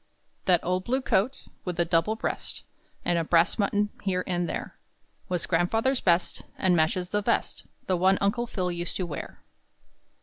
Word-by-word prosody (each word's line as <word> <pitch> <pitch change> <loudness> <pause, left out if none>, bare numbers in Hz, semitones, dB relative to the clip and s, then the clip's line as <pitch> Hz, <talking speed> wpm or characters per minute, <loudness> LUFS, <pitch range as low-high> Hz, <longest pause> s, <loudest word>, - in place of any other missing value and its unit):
That 180 -3 +4
old 185 +1 0
blue 255 +5 +1
coat, 235 +6 +1 0.2
With 180 -1 -4
a 170 - +4
double 165 +5 +2
breast - - -3 0.4
And 175 -1 +2
a - - 0
brass 165 +1 +4
button 205 0 +1
here 185 -2 0
and 175 -1 -1
there, - - -4 0.5
Was 180 -2 0
grandfather's 225 +10 +1
best, 175 0 +2 0.2
And 185 -2 +3
matches 175 +3 +1
the 210 +1 0
vest - - -1 0.2
The 185 - +1
one 190 +2 +4
Uncle 235 +5 +1
Phil 180 -5 -2
used 175 0 -4
to 185 - -1
wear. 150 -4 -7
180 Hz, 170 wpm, -27 LUFS, 175-205 Hz, 0.5 s, That